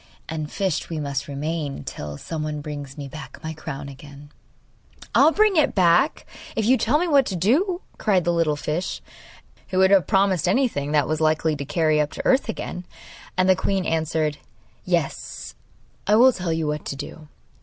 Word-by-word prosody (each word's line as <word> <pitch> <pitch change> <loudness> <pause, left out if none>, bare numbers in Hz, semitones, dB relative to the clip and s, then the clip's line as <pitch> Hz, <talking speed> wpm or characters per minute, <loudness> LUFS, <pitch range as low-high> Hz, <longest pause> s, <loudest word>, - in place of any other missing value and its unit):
And 155 -2 -4
fished 190 -5 -1
we 160 -2 -3
must 140 -2 -3
remain 145 0 -3
till 75 - -6
someone 155 - -4
brings 145 -2 -7
me 140 -1 -6
back 155 +3 -9
my 160 0 -4
crown 145 -2 -7
again!' 145 +1 -12 0.8
'I - - +6
will 315 - +6
bring 425 +1 +3
it 305 - +3
back 180 - +3 0.3
if 220 - 0
you 255 +4 +5
tell 260 +3 +2
me 350 +3 0
what 285 -4 +5
to 190 - -2
do!' 320 - +2 0.2
cried 190 -5 +2
the 175 - +1
little 165 -3 +2
fish, 150 +4 -3 0.7
who 185 - -3
would 190 +1 +5
have 190 -6 +5
promised 190 -3 +2
anything 180 - +1
that 150 -2 +2
was 155 0 -1
likely 155 0 +2
to 140 -1 -5
carry 155 +1 +2
her - - +4
up 145 - -17
to - - -6
earth 260 -2 +3
again. 180 -4 -4 0.5
And 185 0 +3
the 185 - +6
queen 190 0 -1
answered: 155 -2 0 0.5
'Yes, - - -2 0.5
I 210 - +5
will 250 +3 +7
tell 180 -4 -3
you 160 0 -1
what 150 0 -2
to - - -4
do. 150 +2 -9
160 Hz, 190 wpm, -23 LUFS, 150-195 Hz, 0.8 s, will